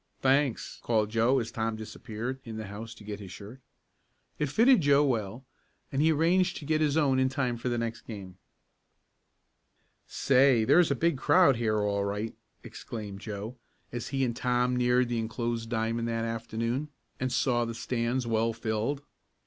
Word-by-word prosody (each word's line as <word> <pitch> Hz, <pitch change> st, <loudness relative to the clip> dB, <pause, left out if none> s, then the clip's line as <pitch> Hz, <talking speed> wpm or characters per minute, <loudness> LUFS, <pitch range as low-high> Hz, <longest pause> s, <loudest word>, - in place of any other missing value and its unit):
"Thanks," 135 Hz, -2 st, +1 dB
called 110 Hz, -2 st, +1 dB
Joe 115 Hz, +4 st, +3 dB
as 115 Hz, -3 st, -2 dB
Tom 115 Hz, -1 st, -2 dB
disappeared 115 Hz, +3 st, -6 dB
in 110 Hz, -2 st, -7 dB
the 110 Hz, -, -5 dB
house 110 Hz, +3 st, -8 dB
to 105 Hz, -, -14 dB
get 105 Hz, 0 st, -6 dB
his 95 Hz, -3 st, -9 dB
shirt. 110 Hz, +7 st, -10 dB, 0.8 s
It 150 Hz, -, 0 dB
fitted 235 Hz, -, +5 dB
Joe 145 Hz, 0 st, +4 dB
well, 115 Hz, -1 st, -2 dB, 0.5 s
and 135 Hz, -, 0 dB
he 160 Hz, +1 st, +4 dB
arranged 175 Hz, +4 st, +2 dB
to 150 Hz, -, -8 dB
get 155 Hz, +1 st, +1 dB
his 150 Hz, -1 st, +2 dB
own 135 Hz, -4 st, +3 dB
in 130 Hz, 0 st, +3 dB
time 130 Hz, -2 st, -1 dB
for 120 Hz, +2 st, -3 dB
the 120 Hz, -, -1 dB
next 115 Hz, -1 st, -4 dB
game. 95 Hz, -4 st, -8 dB, 1.7 s
"Say, 130 Hz, -3 st, +4 dB
there's 175 Hz, +9 st, +5 dB
a 140 Hz, -, +1 dB
big 165 Hz, 0 st, +1 dB
crowd 155 Hz, -8 st, +5 dB
here 110 Hz, -2 st, +1 dB
all 100 Hz, -1 st, 0 dB
right!" 105 Hz, +3 st, -3 dB, 0.3 s
exclaimed 105 Hz, -4 st, -7 dB
Joe, 110 Hz, +3 st, -6 dB, 0.3 s
as 120 Hz, -1 st, -4 dB
he 135 Hz, -1 st, 0 dB
and 120 Hz, -2 st, -2 dB
Tom 125 Hz, 0 st, +1 dB
neared 125 Hz, 0 st, +3 dB
the 120 Hz, -1 st, -1 dB
enclosed 115 Hz, 0 st, -3 dB
diamond 115 Hz, 0 st, -1 dB
that 115 Hz, 0 st, -1 dB
afternoon, 115 Hz, +5 st, -3 dB, 0.3 s
and 130 Hz, 0 st, -1 dB
saw 120 Hz, -1 st, +2 dB
the 115 Hz, -1 st, -4 dB
stands 120 Hz, +1 st, -1 dB
well 115 Hz, 0 st, +1 dB
filled. 115 Hz, +5 st, -2 dB
120 Hz, 175 wpm, -29 LUFS, 110-135 Hz, 1.7 s, fitted